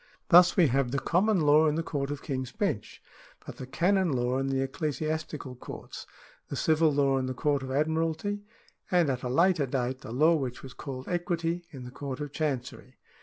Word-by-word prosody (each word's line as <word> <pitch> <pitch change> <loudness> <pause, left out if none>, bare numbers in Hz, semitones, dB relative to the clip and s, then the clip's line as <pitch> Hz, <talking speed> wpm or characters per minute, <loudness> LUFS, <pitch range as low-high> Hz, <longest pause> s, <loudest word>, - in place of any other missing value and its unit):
Thus 180 0 +7
we 180 - +6
have 135 -1 +1
the 140 - -1
common 180 +7 +2
law 150 +1 +5
in 150 - +1
the 165 - -1
Court 140 -3 -3
of 145 -1 -5
King's 130 -3 -3
Bench, 200 - -3 0.4
but - - -9
the 130 - -7
canon 185 +4 +2
law 125 0 0
in 135 - -1
the 135 0 0
Ecclesiastical 155 0 -3
Courts, 125 - -9 0.4
the - - -5
civil 160 0 +3
law 140 -2 +2
in 130 - -2
the 130 - -4
Court 145 0 +1
of 130 - -6
Admiralty, 160 +7 -1 0.5
and, 175 -6 +3
at 125 -1 -3
a 125 - -3
later 165 +1 +3
date, 130 0 -2
the - - -8
law 155 +7 +4
which 130 -6 -3
was 130 -1 -9
called 130 -2 -7
equity 175 -1 -2
in 135 -3 -9
the 125 - -9
Court 135 0 -6
of 145 -1 -5
Chancery. 140 -5 -4
145 Hz, 200 wpm, -28 LUFS, 130-165 Hz, 0.5 s, Thus